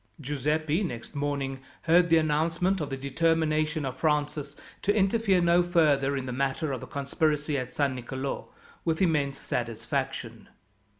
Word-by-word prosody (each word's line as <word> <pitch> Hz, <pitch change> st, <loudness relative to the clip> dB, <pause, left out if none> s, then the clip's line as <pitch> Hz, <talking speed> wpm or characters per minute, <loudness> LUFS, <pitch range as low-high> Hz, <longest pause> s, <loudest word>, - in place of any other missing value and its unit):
Giuseppi, 150 Hz, +4 st, 0 dB
next 120 Hz, -, -5 dB
morning, 140 Hz, -2 st, -2 dB, 0.2 s
heard 170 Hz, +1 st, +4 dB
the 165 Hz, -, +6 dB
announcement 165 Hz, +4 st, +1 dB
of 145 Hz, -, -3 dB
the 135 Hz, -, -3 dB
determination 155 Hz, +2 st, +1 dB
of 130 Hz, -1 st, -4 dB
Francis, 150 Hz, -2 st, 0 dB, 0.3 s
to 205 Hz, -, +2 dB
interfere 200 Hz, -2 st, +3 dB
no 170 Hz, +1 st, +5 dB
further 150 Hz, -6 st, +3 dB
in 130 Hz, -, -3 dB
the 125 Hz, -, -4 dB
matter 135 Hz, +4 st, -1 dB
of 130 Hz, -, -3 dB
the -, -, -8 dB
conspiracy 150 Hz, +1 st, 0 dB
at 130 Hz, -2 st, -3 dB
San 140 Hz, -2 st, +1 dB
Nicolo, 130 Hz, +2 st, -4 dB, 0.3 s
with 160 Hz, -1 st, 0 dB
immense 150 Hz, -6 st, +1 dB
satisfaction. 115 Hz, -1 st, -3 dB
150 Hz, 145 wpm, -28 LUFS, 135-165 Hz, 0.3 s, the